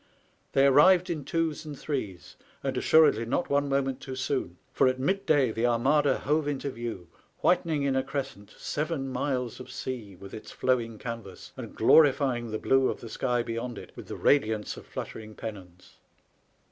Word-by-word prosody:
They 135 0 +5
arrived 175 +6 +6
in 155 -5 -4
twos 165 0 -1
and 150 -3 -8
threes, 110 - -5 0.3
and 135 -1 -1
assuredly 150 -4 +5
not 130 +9 -1
one 140 0 +2
moment 135 -1 0
too 130 - -6
soon; 130 -9 -2 0.2
for - - +4
at 130 0 0
midday 145 - +2
the 115 +2 0
Armada 135 +4 +3
hove 150 +1 0
into 140 -1 -2
view, 115 -8 -6 0.3
whitening 165 -5 +2
in 135 -1 +1
a 130 - +3
crescent 130 -7 -5
seven 150 -3 -3
miles 125 -2 -2
of 130 - -9
sea 115 -7 -6
with 95 +2 -12
its 110 - -8
flowing 120 -3 0
canvas, 115 -5 -8
and - - -8
glorifying 135 -6 +4
the 110 - -2
blue 135 +3 +3
of - - -4
the 115 - -9
sky 120 +1 0
beyond 115 0 -4
it - - -10
with - - -10
the - - -6
radiance 110 -6 +2
of - - -12
fluttering 110 -1 -7
pennons. 90 -6 -9
130 Hz, 170 wpm, -28 LUFS, 115-145 Hz, 0.3 s, arrived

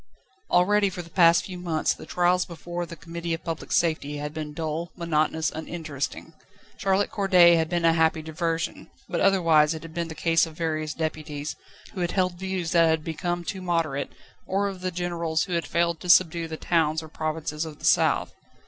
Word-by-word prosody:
Already 200 +3 +4
for 180 -1 -6
the 170 - -16
past 170 -1 +5
few 185 -2 -7
months, 165 -3 0
the - - -12
trials 180 +1 +2
before 175 0 -6
the 170 - -8
Committee 165 +1 -4
of 165 - -12
Public 165 -2 -5
Safety 155 -3 +1
had 150 +1 -5
been 155 -1 -5
dull, 160 +2 -3
monotonous, 160 -2 0
uninteresting. 160 -1 -5 0.4
Charlotte 195 +1 +1
Corday 185 -4 +6
had 160 -1 +2
been 175 -1 0
a 165 - +5
happy 160 -1 +2
diversion, 165 +1 -3 0.2
but 175 - -2
otherwise 165 -5 +4
it 160 - -8
had 165 -1 -10
been 170 0 -2
the 160 - -8
case 165 +1 +2
of 160 -1 -12
various 155 -2 -2
deputies, 155 -2 -4 0.4
who 185 - -4
had 175 - -1
held 180 -2 0
views 190 -3 -3
that 170 -2 +5
had 160 -1 +1
become 175 +2 -3
too 190 +2 -5
moderate, 165 -6 -1 0.4
or 200 +2 +1
of 190 -2 -6
the 185 - -1
generals 170 -2 -1
who 185 - -5
had 170 -1 -1
failed 170 -1 +1
to 180 - -7
subdue 170 -2 +5
the 160 0 -6
towns 160 -2 +1
or - - -9
provinces 155 0 -3
of 155 -2 -8
the - - -8
south. - - +3
165 Hz, 195 wpm, -25 LUFS, 160-175 Hz, 0.4 s, Corday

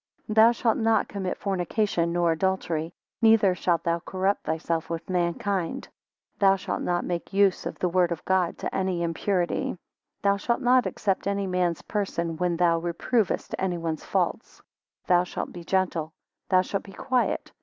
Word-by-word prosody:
8 215 - -2
Thou 225 +1 +7
shaft 235 -1 0
not 225 -2 +2
commit 190 -2 -4
fornication, 190 -2 0
nor 170 -1 +2
adultery. 165 -2 -1 0.3
Neither 220 -4 +5
shalt 170 -2 0
thou 170 0 0
corrupt 190 +3 -1
thyself 160 +1 -2
with 165 0 -4
mankind. 180 0 -1 0.5
Thou 195 -1 +5
shalt 195 - -4
not 175 0 -1
make 175 +1 -4
use 195 -2 +3
of - - -6
the 180 - 0
word 180 0 +2
of 170 - -4
God, 185 -2 +1
to - - -4
any 185 -2 0
impurity, 175 +2 0
9 - - -4 0.5
Thou 200 0 +3
shalt 235 +5 -1
not 250 0 +4
except 195 -1 -1
any 200 0 0
man's 180 -3 0
person, 170 -5 -2
when 175 0 0
thou 170 -1 +3
reprovest 175 +6 -1
any 185 -2 -1
one's 165 -2 -3
faults. - - -2 0.5
Thou 180 -1 +4
shalt 180 - -5
be 175 - -8
gentle. 170 -4 -1 0.4
Thou 185 -1 +4
shalt 195 +1 -3
be 195 - -13
quiet. 255 +4 -1
185 Hz, 170 wpm, -26 LUFS, 170-200 Hz, 0.5 s, Thou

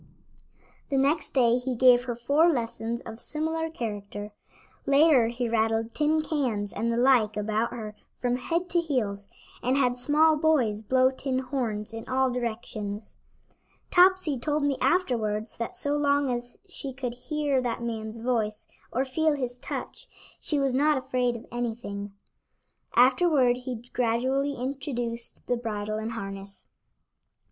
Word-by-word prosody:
The 275 - +1
next 285 +3 +1
day 240 -3 +4
he 250 0 -2
gave 245 0 +6
her 240 -2 -3
four 285 +8 +3
lessons 235 -3 -2
of 225 0 -9
similar 320 +3 -2
character. 205 -6 -5 0.6
Later 275 -4 +5
he 240 +1 -2
rattled 225 0 0
tin 310 +1 +2
cans 240 -11 -1
and 235 +1 -1
the 230 - 0
like 240 -4 +4
about 215 +2 0
her 215 -3 -7 0.2
from 245 0 0
head 335 +8 -1
to 345 - +3
heels, 215 -11 -2 0.3
and 255 +3 +1
had 250 -2 +2
small 305 +4 +4
boys 265 -10 +2
blow 255 +4 +3
tin 265 0 -2
horns 245 -5 -3
in 225 0 -7
all 260 0 +2
directions. 220 -3 -4 0.8
Topsy 360 -6 +4
told 295 +4 0
me 285 -1 +2
afterwards 225 - 0
that 235 - -4
so 285 0 -1
long 285 -2 +2
as 240 0 -4
she 280 -7 -5
could 250 -2 -4
hear 290 +1 -1
that 240 -1 -3
man's 225 -1 -4
voice 220 -3 -1 0.2
or 260 +3 0
feel 310 +4 +1
his 250 -3 -3
touch, - - -6 0.3
she 300 - 0
was 275 -2 +1
not 295 +3 +3
afraid 250 -2 0
of 230 - -8
anything. 220 -4 -4 0.8
Afterward 260 0 +5
he 250 -2 -6
gradually 260 +4 +1
introduced 245 -3 -4
the 245 - 0
bridle 215 -2 -3
and 220 +1 -4
harness. 195 -2 -7
245 Hz, 145 wpm, -27 LUFS, 225-280 Hz, 0.8 s, gave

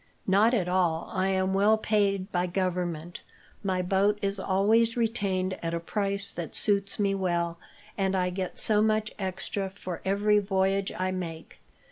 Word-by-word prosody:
"Not 210 +5 +4
at 185 -6 0
all. 175 -3 0
I 190 -1 +1
am 190 0 +1
well 205 +3 +4
paid 200 -3 0
by 180 0 0
Government. 175 -2 -2 0.4
My 185 -2 0
boat 195 +3 +2
is 200 0 -1
always 220 +5 +2
retained 200 -5 0
at 165 0 -2
a - - -1
price 200 +3 -2
that 170 -2 -5
suits 200 -1 +1
me 200 -1 +1
well, 170 -3 -1 0.4
and 190 0 +1
I 180 -1 0
get 185 0 -4
so 210 -1 +3
much 215 0 +1
extra 190 +1 -3
for 185 -3 -7
every 205 +2 +3
voyage 195 0 0
I 185 0 -1
make. 170 -3 -6
190 Hz, 160 wpm, -28 LUFS, 180-205 Hz, 0.4 s, Not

